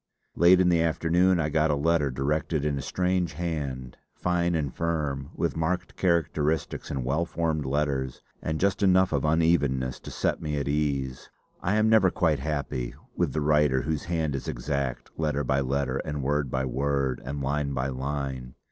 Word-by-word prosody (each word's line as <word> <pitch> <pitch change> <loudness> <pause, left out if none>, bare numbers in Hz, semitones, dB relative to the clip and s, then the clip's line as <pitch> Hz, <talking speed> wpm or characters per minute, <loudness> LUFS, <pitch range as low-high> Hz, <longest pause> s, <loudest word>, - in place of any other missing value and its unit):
Late 90 +2 +6
in 90 -1 +4
the 85 -2 +3
afternoon 85 +3 +2
I 75 -2 0
got 80 +1 +2
a 75 - +2
letter 75 0 +2
directed 75 +3 -1
in 75 -1 +1
a 70 - -3
strange 90 +2 0
hand, 70 -6 -4 0.2
fine 85 -1 0
and 70 -5 -1
firm, 75 -5 -2
with - - -1
marked 80 +3 -2
characteristics 80 -3 0
and 65 -3 -3
well 75 +6 +1
formed 80 -4 -1
letters, 70 -2 -1 0.2
and 80 0 -2
just 100 +1 +1
enough 95 -2 +4
of 70 - +1
unevenness 75 -5 +2
to - - -9
set - - -1
me 75 -1 -2
at 70 - -2
ease. 70 -3 -1 0.3
I 95 +4 +1
am 110 0 +3
never 110 -4 +5
quite 80 -8 +1
happy 70 -4 -3 0.2
with - - 0
the 75 - 0
writer 75 -3 +3
whose 80 -2 -2
hand 80 -4 -1
is 70 - -4
exact, 65 -1 -3
letter 75 -2 0
by 65 +1 +1
letter, 70 0 0
and 75 -1 -3
word 75 0 0
by 65 +1 -1
word, 65 0 -1
and 70 +3 -4
line 70 +1 -1
by 65 +1 -1
line. 65 -2 -4
75 Hz, 180 wpm, -27 LUFS, 70-85 Hz, 0.3 s, Late